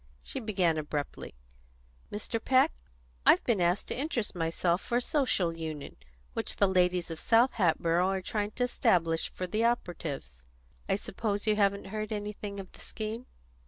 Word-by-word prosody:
She - - -4
began 185 -8 +1
abruptly: 150 - -4 0.8
"Mr. 220 +2 -3
Peck, 265 +4 +4 0.5
I've - - +6
been 225 -7 +1
asked 175 +3 +2
to - - -2
interest 260 -6 -1
myself 170 +1 0
for 240 - 0
a - - +2
Social 245 - +1
Union 160 -3 -6 0.4
which - - -1
the 200 - +4
ladies 180 -2 +2
of 160 - -5
South 235 +3 +4
Hatboro' 170 -2 +2
are 190 0 0
trying 205 +2 -1
to 250 - 0
establish 165 -9 +2
for 185 - -4
the 215 +5 0
operatives. 160 - -2 0.5
I - - +4
suppose 205 +1 -2
you 215 -1 +4
haven't 200 -1 +1
heard 215 0 -3
anything 205 -1 -4
of 190 - -8
the - - -16
scheme?" 220 +3 -4
195 Hz, 160 wpm, -30 LUFS, 170-220 Hz, 0.8 s, I've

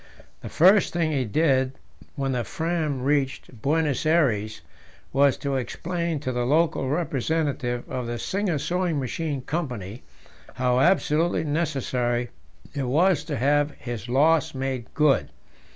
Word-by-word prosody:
The - - -8
first 190 +4 +5
thing 165 -2 0
he 135 -4 0
did 130 +1 +2 0.4
when 135 -2 -1
the 125 -2 -1
Fram 160 -6 -2
reached 135 -4 -1
Buenos 150 -1 +1
Aires 125 -10 +1 0.5
was 140 0 +4
to 140 -1 -2
explain 170 +4 -3
to 130 - -2
the 125 -1 -1
local 145 0 +1
representative 140 -4 -1
of 125 -2 -4
the 120 0 -3
Singer 190 - -1
Sewing 175 0 -1
Machine 140 +1 -3
Company 125 - -4 0.5
how 125 0 +1
absolutely 165 +1 +2
necessary 130 -6 -1 0.4
it 140 -4 -2
was 160 +3 +3
to - - -3
have 145 +3 +2
his 120 -1 -6
loss 150 +3 +3
made 130 -3 -3
good. 150 -3 +3
140 Hz, 135 wpm, -25 LUFS, 125-160 Hz, 0.5 s, first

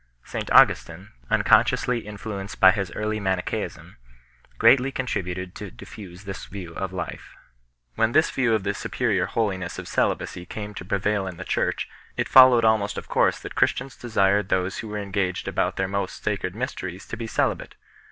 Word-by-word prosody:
St - - -5
Augustin, 90 +5 +4 0.2
unconsciously 120 -4 +3
in 105 -1 -7
fluenced 100 -2 -6
by 95 - +8
his 100 -2 -3
early 110 0 -2
Manichseism, 95 -9 -3 0.6
greatly 135 - +5
contributed 90 -8 -3
to 105 - -7
diffuse 90 0 -11
this 95 -1 -7
view 90 -5 -8
of 95 +2 -4
life 90 -3 -6 0.3
\ - - -47
When 110 - +2
this 155 +1 +4
view 120 -4 +2
of 105 - -2
the 100 0 -1
superior - - -1
holiness 95 -6 -2
of - - -7
celibacy 90 0 -1
came 105 0 -6
to 90 - -8
prevail 100 +1 0
in 90 -3 -7
the 95 - -6
Church, - - -1 0.3
it - - 0
followed 130 -3 +8
almost 110 -2 +2
of - - -6
course - - +3
that - - -8
Christians 135 - 0
desired 100 -4 +1
those 90 +1 0
who 110 - -6
were 105 0 -5
engaged 100 -2 -2
about - - 0
their 95 - -1
most 100 +1 -3
sacred 100 -3 -2
mysteries 95 -7 -5
to - - -5
be 115 0 -5
celibate. - - -1
100 Hz, 175 wpm, -24 LUFS, 95-110 Hz, 0.6 s, by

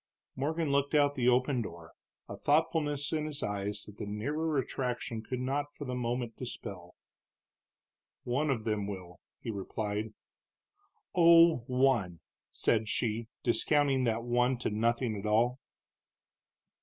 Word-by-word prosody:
Morgan 155 +3 -1
looked 140 +2 +1
out 145 -1 +5
of - - -18
the 125 -2 +3
open 125 +1 +2
door, 85 -6 -8 0.4
a - - -6
thoughtfulness 145 -1 +1
in 155 -1 0
his 150 -1 -5
eyes 105 0 -3
that 105 -1 -13
the 105 - -5
nearer 145 +9 -1
attraction 125 -3 -2
could 125 +3 -4
not 140 +3 -1
for 145 - -8
the 125 - -3
moment 120 -1 -2
dispel. 95 -8 -8 1.3
"One 140 +5 0
of 120 -5 0
them 105 -2 -1
will," 90 -3 -7 0.2
he 115 - -3
replied. 105 +1 -3 1.0
"Oh, 170 -1 +7
one!" 125 - +2 0.3
said 110 -1 +1
she, 115 0 -1 0.2
discounting 135 +1 +2
that 115 0 0
one 125 +1 +2
to 120 - -2
nothing 115 +2 +1
at 105 - -4
all. 120 +4 +2
125 Hz, 140 wpm, -31 LUFS, 110-145 Hz, 1.3 s, Oh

